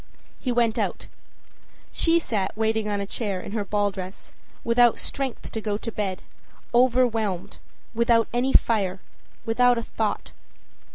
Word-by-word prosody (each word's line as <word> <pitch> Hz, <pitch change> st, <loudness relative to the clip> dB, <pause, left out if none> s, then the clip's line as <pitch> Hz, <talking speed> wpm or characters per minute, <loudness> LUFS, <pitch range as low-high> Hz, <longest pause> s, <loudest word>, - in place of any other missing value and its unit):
â -, -, -24 dB, 0.4 s
He 255 Hz, -, -2 dB
went 235 Hz, -2 st, +2 dB
out. -, -, -2 dB, 0.9 s
She 335 Hz, 0 st, +3 dB
sat 215 Hz, -, -2 dB
waiting 220 Hz, -1 st, 0 dB
on 205 Hz, -1 st, -1 dB
a 200 Hz, -, -2 dB
chair 200 Hz, -2 st, -3 dB
in 180 Hz, -, -8 dB
her 215 Hz, -1 st, -1 dB
ball 205 Hz, 0 st, 0 dB
dress, 190 Hz, 0 st, -8 dB, 0.3 s
without 235 Hz, 0 st, +4 dB
strength 270 Hz, -3 st, -3 dB
to 220 Hz, -, -4 dB
go 210 Hz, -1 st, -1 dB
to 230 Hz, +2 st, -5 dB
bed, 195 Hz, -4 st, -3 dB, 0.5 s
overwhelmed, 235 Hz, -6 st, +2 dB, 0.3 s
without 230 Hz, 0 st, +3 dB
any 250 Hz, +2 st, +1 dB
fire, 195 Hz, -7 st, +2 dB, 0.5 s
without 245 Hz, +2 st, +4 dB
a 230 Hz, -, -2 dB
thought. 220 Hz, -1 st, -3 dB
225 Hz, 150 wpm, -25 LUFS, 205-240 Hz, 0.9 s, without